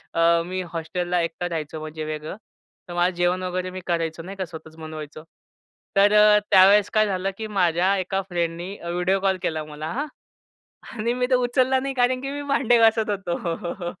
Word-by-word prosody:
अ, 165 Hz, 0 st, +4 dB
मी 185 Hz, +1 st, -3 dB
हॉस्टेलला 175 Hz, +2 st, -1 dB
एकटा 170 Hz, +1 st, -3 dB
राहायचो 160 Hz, -2 st, -4 dB
म्हणजे 155 Hz, 0 st, -6 dB
वेगळं. 155 Hz, +3 st, -5 dB, 0.5 s
तर 175 Hz, -, -7 dB
माझं 175 Hz, +1 st, +1 dB
जेवण 175 Hz, +1 st, +1 dB
वगैरे 185 Hz, 0 st, -2 dB
मी 185 Hz, -, -7 dB
करायचो 165 Hz, -2 st, -1 dB
नाही 195 Hz, +3 st, -8 dB
का, 190 Hz, -, -2 dB
स्वतःच 160 Hz, -1 st, -11 dB
बनवायचं. 155 Hz, -1 st, -8 dB, 0.7 s
तर 200 Hz, +1 st, +5 dB
अ, 210 Hz, 0 st, +7 dB
त्यावेळेस 200 Hz, +2 st, +6 dB
काय 215 Hz, 0 st, +4 dB
झालं, 190 Hz, 0 st, -1 dB
की 220 Hz, -, -4 dB
माझ्या 185 Hz, -1 st, +2 dB
एका 190 Hz, +1 st, -1 dB
फ्रेंडनी 175 Hz, +2 st, -3 dB
व्हिडिओ 180 Hz, +3 st, 0 dB
कॉल 190 Hz, -1 st, +1 dB
केला 160 Hz, -3 st, -2 dB
मला 150 Hz, 0 st, -7 dB
हां. 290 Hz, +5 st, -2 dB, 0.8 s
आणि 230 Hz, +1 st, -2 dB
मी 250 Hz, 0 st, 0 dB
तर 255 Hz, -, +6 dB
उचलला 255 Hz, +1 st, +2 dB
नाही, 275 Hz, +1 st, -3 dB
कारण 255 Hz, 0 st, +2 dB
की 275 Hz, +1 st, -4 dB
मी 290 Hz, 0 st, -4 dB
भांडे 245 Hz, -4 st, +3 dB
घासत 225 Hz, -1 st, +4 dB
होतो. 175 Hz, -2 st, -3 dB
185 Hz, 180 wpm, -24 LUFS, 165-210 Hz, 0.8 s, अ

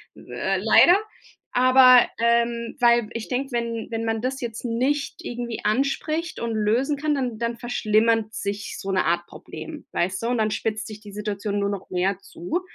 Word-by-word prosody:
Äh, -, -, -3 dB
leider. 355 Hz, +2 st, +6 dB, 0.6 s
Aber, 255 Hz, 0 st, +7 dB
ähm, 235 Hz, 0 st, +1 dB
weil 235 Hz, -3 st, +4 dB
ich 230 Hz, -2 st, -5 dB
denke, 270 Hz, +2 st, -2 dB
wenn 235 Hz, -1 st, -2 dB
wenn 225 Hz, 0 st, -2 dB
man 225 Hz, -1 st, -1 dB
das 260 Hz, +2 st, -2 dB
jetzt 235 Hz, 0 st, -5 dB
nicht 260 Hz, +5 st, 0 dB
irgendwie 240 Hz, -1 st, -5 dB
anspricht 280 Hz, +8 st, -1 dB
und 235 Hz, 0 st, -2 dB
lösen 225 Hz, +7 st, +1 dB
kann, 300 Hz, +1 st, 0 dB
dann 245 Hz, -5 st, -3 dB
dann 235 Hz, 0 st, -2 dB
verschlimmert 225 Hz, -2 st, +1 dB
sich 200 Hz, -1 st, -4 dB
so 195 Hz, -, -4 dB
'ne 190 Hz, -, +2 dB
Art 175 Hz, +1 st, +1 dB
Problem, 310 Hz, -2 st, -10 dB
weißt 185 Hz, +2 st, -1 dB
du, -, -, 0 dB
und 245 Hz, 0 st, 0 dB
dann 215 Hz, -1 st, +1 dB
spitzt 215 Hz, 0 st, -2 dB
sich 215 Hz, -1 st, -9 dB
die 210 Hz, -2 st, -11 dB
Situation 205 Hz, 0 st, -3 dB
nur 200 Hz, 0 st, 0 dB
noch 200 Hz, -2 st, -5 dB
mehr 185 Hz, +1 st, 0 dB
zu, 200 Hz, -, -4 dB
230 Hz, 180 wpm, -24 LUFS, 210-250 Hz, 0.6 s, Aber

